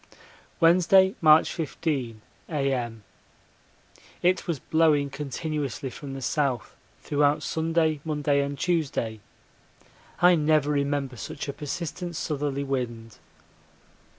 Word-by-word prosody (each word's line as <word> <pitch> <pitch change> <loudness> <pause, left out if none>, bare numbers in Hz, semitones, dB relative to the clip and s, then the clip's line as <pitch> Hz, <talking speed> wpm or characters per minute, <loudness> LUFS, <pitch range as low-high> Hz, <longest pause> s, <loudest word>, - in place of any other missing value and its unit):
Wednesday, 185 +3 +5
March 155 0 +6
15, 140 -8 -3 0.3
A.M. 130 -7 -2 1.2
It 185 +2 +2
was 170 -3 -1
blowing 150 -1 +2
continuously 140 -1 -4
from 135 0 -8
the 135 - -6
south 135 -7 -1 0.3
throughout 145 0 +2
Sunday, 160 -1 0
Monday, 145 -2 +1
and 140 0 -3
Tuesday 140 -11 -1 1.0
I 180 +1 +6
never 155 -2 +2
remember 140 -3 -1
such 140 - -6
a 140 - -3
persistent 170 +4 -5
southerly 145 -3 -2
wind. 120 -5 -4
145 Hz, 100 wpm, -26 LUFS, 135-160 Hz, 1.2 s, March